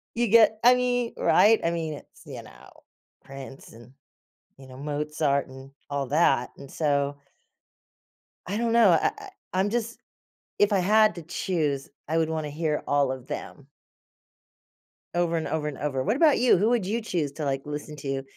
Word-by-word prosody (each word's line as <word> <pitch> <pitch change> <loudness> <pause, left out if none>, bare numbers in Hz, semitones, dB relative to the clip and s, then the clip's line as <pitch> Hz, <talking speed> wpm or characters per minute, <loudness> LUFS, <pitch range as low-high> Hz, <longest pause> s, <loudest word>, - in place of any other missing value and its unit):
You 240 0 +1
get 220 0 +5
I 245 +1 +7
mean, 245 -1 -1
right, 220 +1 +4
I 170 - +1
mean, 160 -2 -3
it's, - - -16
you - - -8
know, - - -16 0.5
Prince 135 0 -11
and, 120 +3 -15 0.6
you 135 -1 -14
know, 130 0 -12
Mozart 150 0 -1
and 135 +1 -12 0.2
all 140 -2 -2
that 135 -3 +2
and 140 -1 -12
so 145 -2 0 1.3
I 195 - -3
don't 230 0 0
know, 230 -5 +5
I 165 - +3
I - - -10 0.2
I'm 190 +2 +1
just 230 +1 -3 0.6
if 205 +1 +3
I 195 - +3
had 215 +3 +4
to 170 - -7
choose 150 -4 -2 0.2
I 160 +2 0
would 160 -1 +1
wanna 155 -2 -3
hear 150 0 -2
all 140 -2 +2
of 130 -1 -7
them. 140 - -7 1.5
Over, 170 -1 +1
and 160 - -3
over, 155 -1 -2
and 145 -3 -5
over. 135 -3 -2
What 220 - 0
about 305 -2 +5
you? 245 -4 +4
Who 210 +5 +2
would 235 -5 +1
you 225 +5 -2
choose 165 -10 -2
to, 150 +1 -5
like, 135 0 -2
listen 150 +1 -6
to 135 -1 -4
155 Hz, 180 wpm, -26 LUFS, 140-210 Hz, 1.5 s, I